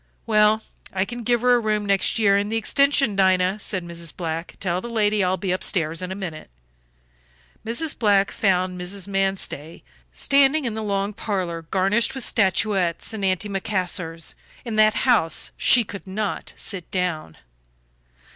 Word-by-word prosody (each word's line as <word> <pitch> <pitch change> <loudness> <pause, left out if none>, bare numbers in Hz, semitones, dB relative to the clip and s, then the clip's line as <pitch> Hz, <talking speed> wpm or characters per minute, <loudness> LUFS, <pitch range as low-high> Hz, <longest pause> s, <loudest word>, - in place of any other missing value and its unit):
Well, 215 -1 +3 0.3
I 190 0 0
can 240 +3 -7
give 240 0 +1
her 250 0 +4
a 245 - +4
room 215 -2 -1
next 195 +2 +1
year 200 -3 +4
in 200 +1 0
the 225 - 0
extension. 275 0 +2
Dinah," 190 +1 +2
said 190 -3 -3
Mrs. 170 -2 -7
Black, 165 -1 -4
"tell 180 -1 -1
the 235 - -7
lady 210 -3 +1
I'll 185 +1 +1
be 190 -2 -2
upstairs 165 -2 0
in 180 0 -5
a - - -4
minute." 170 - -7 1.1
Mrs. 260 +8 -2
Black 200 -3 +3
found 185 -2 0
Mrs. 190 +2 -3
Manstey 195 -5 -2 0.3
standing 275 +1 +3
in 230 - -2
the 220 - -4
long 200 -1 -1
parlor 185 -6 -3
garnished 195 +7 +1
with 265 - -2
statuettes 190 -2 +1
and 215 -2 -5
antimacassars; 185 -3 -1 0.3
in 230 -2 -4
that 215 0 +5
house 225 -11 +2
she 245 - +4
could 200 -2 -9
not 205 +1 -4
sit 185 -4 -6
down. 175 - -3
195 Hz, 155 wpm, -23 LUFS, 180-220 Hz, 1.1 s, that